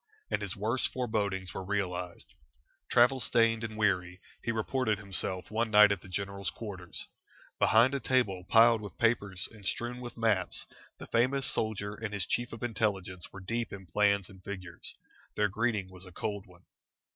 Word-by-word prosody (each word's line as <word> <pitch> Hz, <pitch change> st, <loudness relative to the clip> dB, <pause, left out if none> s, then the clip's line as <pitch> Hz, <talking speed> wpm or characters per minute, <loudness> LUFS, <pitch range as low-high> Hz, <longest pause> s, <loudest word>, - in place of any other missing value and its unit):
And -, -, +1 dB
his 100 Hz, -3 st, -3 dB
worst 110 Hz, +6 st, 0 dB
forebodings 100 Hz, -7 st, -1 dB
were 95 Hz, -, -4 dB
realised. 90 Hz, -3 st, -3 dB, 0.6 s
Travel 125 Hz, +2 st, +5 dB
stained 115 Hz, -2 st, +3 dB
and 110 Hz, -1 st, -5 dB
weary, 90 Hz, -4 st, +1 dB, 0.2 s
he 115 Hz, -, -1 dB
reported 115 Hz, 0 st, 0 dB
himself 95 Hz, -2 st, 0 dB
one 115 Hz, +1 st, 0 dB
night 105 Hz, -1 st, +8 dB
at 100 Hz, -3 st, -1 dB
the -, -, -13 dB
general's 100 Hz, 0 st, -3 dB
quarters. 95 Hz, -5 st, -6 dB, 0.5 s
Behind 120 Hz, +4 st, +5 dB
a 140 Hz, -, 0 dB
table 115 Hz, -8 st, +1 dB
piled 115 Hz, 0 st, +6 dB
with 105 Hz, -3 st, -9 dB
papers 100 Hz, -5 st, +1 dB
and 110 Hz, -3 st, -14 dB
strewn 120 Hz, +5 st, -2 dB
with 120 Hz, -1 st, -8 dB
maps 110 Hz, -5 st, +1 dB, 0.3 s
the -, -, -9 dB
famous 130 Hz, +3 st, +2 dB
soldier 100 Hz, -2 st, -1 dB
and 105 Hz, 0 st, -5 dB
his 95 Hz, -4 st, 0 dB
Chief 120 Hz, +1 st, -1 dB
of 115 Hz, -, -8 dB
Intelligence 100 Hz, -6 st, -2 dB
were 95 Hz, -, -9 dB
deep 115 Hz, +4 st, -2 dB
in 95 Hz, -1 st, -8 dB
plans 100 Hz, +2 st, +2 dB
and 95 Hz, -2 st, -15 dB
figures. 90 Hz, -4 st, -6 dB, 0.4 s
Their 105 Hz, 0 st, +2 dB
greeting 110 Hz, -2 st, 0 dB
was 90 Hz, 0 st, -11 dB
a 90 Hz, -, -12 dB
cold 100 Hz, +2 st, -4 dB
one. 90 Hz, 0 st, -19 dB
105 Hz, 170 wpm, -31 LUFS, 95-115 Hz, 0.6 s, night